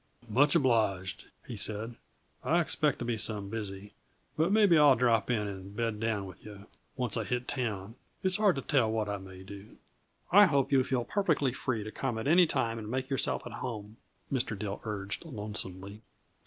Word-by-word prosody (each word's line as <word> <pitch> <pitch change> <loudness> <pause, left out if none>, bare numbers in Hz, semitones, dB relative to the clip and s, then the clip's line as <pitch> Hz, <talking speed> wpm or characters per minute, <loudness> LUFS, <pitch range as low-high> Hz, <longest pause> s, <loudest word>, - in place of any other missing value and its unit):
"Much 145 +8 +4
obliged," 110 - +1 0.2
he 120 - -6
said. 110 +3 -1 0.5
"I 170 - +3
expect 150 -4 +1
to 120 - -5
be 120 -2 -1
some 105 -1 -1
busy, 105 -2 -6 0.4
but 160 +4 +2
maybe 205 -5 +5
I'll 145 -3 +7
drop 115 -2 +2
in 105 -4 0
and 100 0 -8
bed 115 -2 -1
down 110 -3 -1
with 95 - -12
yuh; 105 -1 -11 0.3
once 125 -3 0
I 115 - 0
hit 125 +5 -2
town, 110 -6 -3 0.3
it's 190 0 +2
hard 205 -5 +4
to 135 - -4
tell 130 -7 +2
what 110 -1 -1
I 100 0 -2
may 95 -1 -11
do." 100 +2 -11 0.5
"I 205 +2 +8
hope 140 -5 +1
you'll 130 -2 +4
feel 125 -2 -1
perfectly 160 -10 +1
free 120 -4 -2
to 110 - -7
come 125 -2 -3
at 110 - -3
any 175 +3 +6
time 115 -6 -1
and 105 -1 -7
make 130 +2 -3
yourself 135 -7 0
at - - -7
home," 110 -3 -6 0.4
Mr. 120 -5 0
Dill 100 0 -4
urged 100 -2 -3
lonesomely. 105 - -5
115 Hz, 190 wpm, -30 LUFS, 105-135 Hz, 0.5 s, I